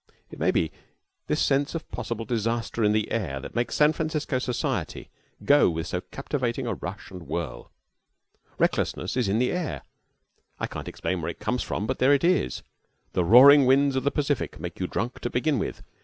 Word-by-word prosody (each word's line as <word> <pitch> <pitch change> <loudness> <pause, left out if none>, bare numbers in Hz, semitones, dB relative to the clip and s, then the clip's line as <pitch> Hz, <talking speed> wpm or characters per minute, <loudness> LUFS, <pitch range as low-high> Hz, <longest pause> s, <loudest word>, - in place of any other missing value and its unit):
It - - -10
may - - +2
be 80 - +1 0.6
this - - 0
sense 140 +3 +1
of 165 - -5
possible 115 -1 -4
disaster 115 0 -1
in 105 - +4
the 110 0 0
air 90 -12 -2
that - - -9
makes 120 +1 -1
San 150 +1 +4
Francisco 155 -4 -2
society 125 -1 -3 0.3
go 145 -7 +6
with 80 -1 -3
so 90 -1 -3
captivating 130 -1 -3
a 115 - -1
rush 95 +2 -7
and 90 -3 -10
whirl. 85 -7 -5 0.9
Recklessness - - 0
is 125 -4 +1
in 100 - +2
the 125 +2 +1
air. 180 -3 -3 0.8
I - - -1
can't - - -7
explain 95 -2 -3
where 80 - -3
it 85 - -6
comes 110 +4 -1
from, 105 - -3
but - - -3
there 135 +3 +5
it 140 - -2
is. 170 - +1 0.5
The 90 - +2
roaring 130 - +8
winds 135 +1 +4
of 130 - 0
the 140 - +3
Pacific 145 -2 -2
make - - -7
you - - -1
drunk 120 +2 -3
to 120 - -3
begin 135 +2 0
with. - - -4
120 Hz, 195 wpm, -26 LUFS, 105-140 Hz, 0.9 s, roaring